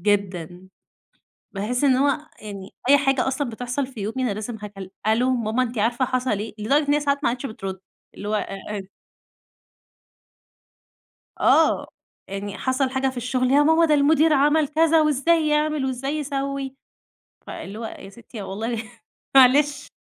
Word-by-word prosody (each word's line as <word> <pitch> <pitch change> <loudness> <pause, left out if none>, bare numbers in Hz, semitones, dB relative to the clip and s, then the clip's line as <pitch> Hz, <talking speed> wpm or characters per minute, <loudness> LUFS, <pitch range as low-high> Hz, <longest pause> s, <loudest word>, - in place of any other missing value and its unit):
جدًا. 185 -3 -1 0.8
باحِس 220 +6 -2
إن 270 -3 +5
هو 280 +3 +2 0.2
يعني 200 -2 -8 0.2
أي 285 - +8
حاجة 270 -2 +1
أصلًا 265 0 -1
بتحصَل 250 +4 -3
في 260 -4 -11
يومي 215 +5 -4
أنا 240 - 0
لازم 220 +3 -5
هكل 195 -2 -8 0.2
"ألو 235 +4 +3
ماما 230 +1 0
أنتِ 245 -1 -5
عارفة 240 +4 +1
حصَل 255 -4 -1
إيه؟" 215 +1 -5
لدرجة 285 +7 +2
إن 290 - +3
هي 295 - +3
ساعات 280 0 -1
ما - - +3
عادِتش 250 +3 -4
بتُرُد، 195 -5 -6 0.4
اللي 205 - -7
هو - - -1
آآ، 210 - -2
آآ 200 -2 -5 2.5
آه، - - +4 0.4
يعني 200 +1 -5
حصَل 260 0 0
حاجة 265 0 0
في 260 - -6
الشغل، 250 +1 0
"يا 285 +2 +5
ماما 320 +2 +4
ده 310 - +4
المدير 305 +2 +4
عمَل 295 +1 +3
كذا، 320 +2 +3
وإزاي 305 +2 +2
يعمَل 300 -1 +1
وإزاي 270 +3 -2
يسوِّي"، 275 -2 -3 0.7
فاللي 200 +3 -7
هو 230 - -6
"يا 195 - -8
ستي 225 +1 -10
والله 220 +4 -3 0.5
معلش." 275 +3 +5
255 Hz, 160 wpm, -23 LUFS, 215-285 Hz, 2.5 s, أي